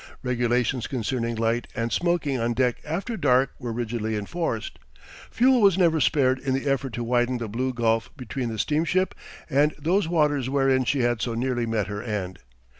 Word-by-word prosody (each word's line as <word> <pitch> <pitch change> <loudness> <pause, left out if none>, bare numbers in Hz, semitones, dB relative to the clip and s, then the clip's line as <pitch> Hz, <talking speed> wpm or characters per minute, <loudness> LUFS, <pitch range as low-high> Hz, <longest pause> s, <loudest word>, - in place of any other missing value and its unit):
Regulations 125 0 0
concerning 115 -1 -2
light 115 +1 0
and 115 -1 -2
smoking 155 -4 0
on 115 +1 0
deck 125 -1 +1
after 190 +10 -3
dark 135 - +3
were 120 -2 -4
rigidly 115 -1 -2
enforced. 115 - -3 0.5
Fuel 255 0 +4
was 195 -3 +5
never 165 -4 +3
spared 130 -2 +3
in 130 -1 -1
the 135 +2 -3
effort 135 -2 0
to 120 - -3
widen 120 +1 +1
the 115 -1 -4
blue 125 +5 -2
gulf 115 -2 0
between 125 -1 -4
the 110 - -5
steamship 170 - +1 0.3
and 145 +3 +2
those 170 +5 +1
waters 150 -6 +1
wherein 135 -1 +2
she 140 +1 +1
had 120 -2 +1
so 120 -1 -2
nearly 120 0 -1
met 110 -3 0
her 105 +2 -5
end. 105 -5 -4
125 Hz, 180 wpm, -25 LUFS, 115-145 Hz, 0.5 s, was